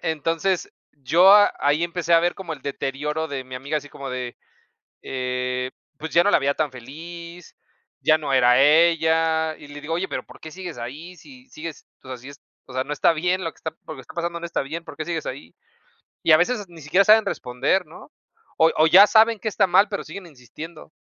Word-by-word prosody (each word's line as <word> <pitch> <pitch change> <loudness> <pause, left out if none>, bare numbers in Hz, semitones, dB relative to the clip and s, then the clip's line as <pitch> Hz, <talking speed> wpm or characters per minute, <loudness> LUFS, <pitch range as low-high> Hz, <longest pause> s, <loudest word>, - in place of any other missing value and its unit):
Entonces, 165 +4 -1 0.2
yo 160 +7 +4
a 205 0 +6
ahí 145 +3 +1
empecé 170 0 -2
a 165 - +6
ver 175 +1 0
como 185 -4 -7
el 145 -4 -9
deterioro 145 +3 -3
de 135 -3 -5
mi 130 0 -10
amiga 140 +4 -3
así 145 -1 -5
como 140 -1 -8
de, 125 -1 -5 0.7
eh, 125 0 -3 0.3
pues, 155 +1 -7
ya 170 - +5
no 205 - +2
la - - +5
veía 140 0 +1
tan 150 -3 -1
feliz, 170 +7 -11 0.5
ya 155 - +4
no 145 -3 -3
era 125 0 +5
ella. 160 +1 +3
Y 145 - -13
le 145 0 -10
digo, 160 +2 -4
oye, 180 +3 -1
pero - - -4
¿por - - -16
qué 160 - -9
sigues 180 -1 -8
ahí? 145 +10 -8
Si 255 - -16
sigues, 165 -4 -9 0.2
o - - -15
sea, 130 - -5
sí 130 +3 -12
es 140 -1 -14 0.2
o 130 - -13
sea, 130 +1 -1
no 150 - -3
está 150 - +3
bien 180 +3 -1
lo 165 - -3
que - - -30
está 160 - -5
p 160 - -37
lo - - -7
que 130 - -10
está - - -14
pasando 170 0 -3
no 170 - -6
está 170 - -2
bien, 160 +5 -6
¿por - - -10
qué 155 - -4
sigues 165 -2 -4
ahí? 85 -10 -7 0.7
Y 165 - +5
a - - +8
veces 205 +4 0
ni 170 -2 -14
siquiera 180 +7 +2
saben 215 0 +6
responder, 155 +3 -1
¿no? - - -14 0.5
O 160 - +5
o 155 - +5
ya 190 +5 +8
saben 225 0 +4
qué 205 - -5
está 205 -2 +2
mal, 190 +4 +4
pero 200 -1 -4
siguen 200 -2 -9
insistiendo. 155 +4 -11
160 Hz, 230 wpm, -23 LUFS, 140-175 Hz, 0.7 s, a